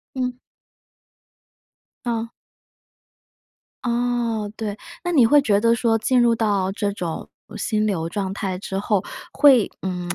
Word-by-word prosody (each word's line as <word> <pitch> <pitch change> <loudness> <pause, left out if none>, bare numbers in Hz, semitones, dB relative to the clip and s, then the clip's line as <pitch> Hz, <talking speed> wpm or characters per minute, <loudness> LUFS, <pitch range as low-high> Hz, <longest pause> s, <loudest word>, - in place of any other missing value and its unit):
嗯。 250 -1 -2 1.7
嗯。 230 -1 -2 1.5
哦， 235 -3 -1
对。 210 -2 -4 0.3
那 350 - -1
你 275 -8 +5
会 290 +5 +6
觉 205 -7 +2
得 230 +2 +3
说 230 -1 +2
进 245 +3 +2
入 235 -1 +4
到 205 -4 +1
这 200 0 -1
种 175 -5 -5 0.3
心 215 -2 0
流 170 -6 -1
状 195 +1 -3
态 190 -2 -3
之 190 0 -5
后， 205 -1 0 0.3
会 270 -7 +5
嗯， 180 -2 -4
220 Hz, 135 characters per minute, -22 LUFS, 200-240 Hz, 1.7 s, 会